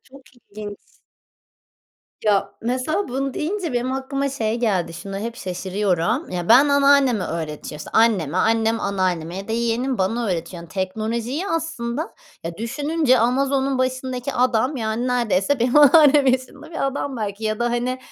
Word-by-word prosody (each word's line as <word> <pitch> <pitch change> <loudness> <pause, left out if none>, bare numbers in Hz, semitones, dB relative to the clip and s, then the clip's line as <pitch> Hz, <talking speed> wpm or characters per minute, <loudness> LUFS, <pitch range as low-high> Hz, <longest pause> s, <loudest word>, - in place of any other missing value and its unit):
çok 270 +1 -16
ilginç. 210 -3 -9 1.5
Ya, 205 -2 +2
mesela 255 - -1
bunu 270 +1 -2
deyince 345 0 -2
benim 245 +2 -1
aklıma 275 +1 -2
şey 230 -4 -2
geldi. 185 -8 0
Şuna 195 +3 -6
hep 230 +3 -5
şaşırıyorum. 190 - -1
Ya, 175 -1 -4
ben 260 +6 +7
anneanneme 280 -7 +4
öğretiyor 155 -2 -5
işte 150 - -9
anneme, 190 -9 +3
annem 225 +2 +2
anneanneme 185 -3 -1
ya 195 +2 -7
da - - -2
yeğenim 235 +3 0
bana 225 +5 0
öğretiyor. 175 -2 -3
Yani 170 - -13
teknolojiyi 220 - -3
aslında 320 -4 -3 0.3
ya, 165 0 -5
düşününce 285 +4 +1
Amazon'un 270 +3 +1
başındaki 255 0 -2
adam 255 +2 +1
yani 225 +1 -2
neredeyse 240 0 +1
benim 245 +4 +2
anneannem 295 -1 +7
yaşında 260 +4 -1
bir 315 - -1
adam 275 0 -3
belki 210 -1 -4
ya 215 0 -1
da 240 - 0
hani 245 +2 -1
240 Hz, 150 wpm, -22 LUFS, 205-270 Hz, 1.5 s, ben